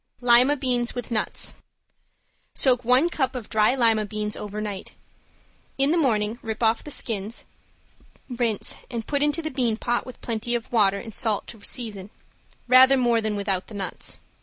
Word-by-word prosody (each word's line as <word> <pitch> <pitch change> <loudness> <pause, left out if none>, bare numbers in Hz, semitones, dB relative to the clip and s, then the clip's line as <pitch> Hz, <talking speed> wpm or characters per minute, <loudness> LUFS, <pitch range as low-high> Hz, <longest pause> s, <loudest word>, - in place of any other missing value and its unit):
~LIMA 250 +4 +5
BEANS 245 -3 -1
WITH 245 0 -5
NUTS~ 215 -2 -1 1.0
Soak 250 -2 +3
one 250 +7 +5
cup 270 -7 -1
of 245 -4 -6
dry 215 +3 +3
lima 225 -4 +3
beans 210 0 -4
over 210 0 -6
night. 205 -2 -5 0.8
In 275 +2 +2
the - - +2
morning 225 -5 0
rip 225 +1 -4
off 225 0 +2
the - - -8
skins, 225 -6 -2 0.8
rinse 235 -4 -1
and 230 -3 -5
put 285 -1 -1
into 295 +3 +1
the 315 - -3
bean 245 -5 0
pot 240 +1 -1
with 255 - -10
plenty 235 +1 -3
of 235 - -5
water 200 -4 +3
and 225 +2 -8
salt 220 -3 0
to 225 -3 -11
season, 210 -6 -4 0.6
rather 260 +2 +7
more 240 -2 +2
than 215 -1 -2
without 195 -2 -2
the 215 - -10
nuts. 190 -3 -4
235 Hz, 170 wpm, -24 LUFS, 215-255 Hz, 1.0 s, rather